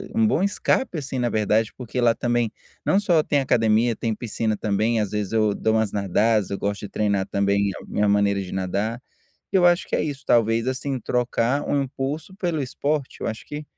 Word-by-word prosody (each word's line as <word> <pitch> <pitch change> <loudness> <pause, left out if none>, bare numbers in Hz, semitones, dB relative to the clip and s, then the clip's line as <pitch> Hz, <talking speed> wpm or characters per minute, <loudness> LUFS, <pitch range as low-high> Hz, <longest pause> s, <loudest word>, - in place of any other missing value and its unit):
um 225 0 +4
bom 205 -5 +2
escape, 200 0 0
assim, 135 -3 -4
na 120 - +1
verdade, 110 0 +1
porque 125 0 -4
lá 115 -1 +4
também, 120 -1 0 0.3
não 195 - +3
só 175 -6 +3
tem 145 -1 +1
academia, 115 -2 +2
tem 115 -2 -2
piscina 110 -1 -2
também, 110 +2 +1
às 105 -1 -3
vezes, 105 -1 -2
eu 110 -2 +2
dou 110 +2 0
umas 110 -2 +1
nadadas, 105 +2 +1
eu 100 - -3
gosto 100 0 -2
de 105 - -6
treinar, 100 -2 0
também, 100 0 +1 0.2
minha 105 0 0
maneira 100 -1 +2
de 95 - -7
nadar, 100 +5 -2 0.5
eu 185 -2 +4
acho 175 0 +4
que - - -2
é - - 0
isso, 140 -3 -5
talvez, 115 0 +3
assim, 130 +1 -2
trocar 125 +3 0
um 140 -1 +2
impulso 140 +7 -5
pelo 175 -6 -2
esporte, 140 +2 -2
eu - - -3
acho 110 0 -6
que 150 +1 -6
115 Hz, 200 wpm, -23 LUFS, 105-140 Hz, 0.5 s, um